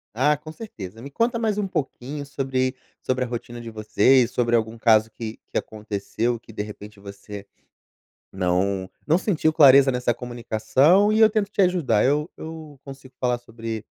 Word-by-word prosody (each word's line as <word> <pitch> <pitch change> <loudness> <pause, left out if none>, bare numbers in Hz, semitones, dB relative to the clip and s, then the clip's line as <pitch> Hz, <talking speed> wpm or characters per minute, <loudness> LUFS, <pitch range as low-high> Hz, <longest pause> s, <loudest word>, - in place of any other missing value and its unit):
Ah, 145 +5 +3
com 150 +2 -11
certeza. 115 - -9
Me 140 - -8
conta 235 - 0
mais 220 -3 0
pouquinho 145 -3 -4
sobre, 135 -2 -2 0.3
sobre 130 0 0
a - - -5
rotina 120 0 -6
de 115 -1 -8
vocês, 115 +3 +3
sobre 120 -1 +1
algum 110 0 -2
caso 110 -1 +4
que 110 0 -7
que - - 0
aconteceu, 110 +2 -3
que, 115 - -15
de 105 - -3
repente 105 0 -10
você 100 0 -10 0.9
não 95 +1 -1 0.2
não 160 +3 +3
sentiu 165 -5 +1
clareza 140 -2 +7
nessa 125 -1 0
comunicação, 125 - +2
e 215 - +2
eu 220 -1 +7
tento 210 -2 -1
te 210 - -1
ajudar. 165 - +2
Eu 150 +4 +1
eu 160 -3 -9
consigo 135 -1 -12
falar 125 -1 +1
sobre 115 -2 -7
125 Hz, 165 wpm, -23 LUFS, 110-150 Hz, 0.9 s, clareza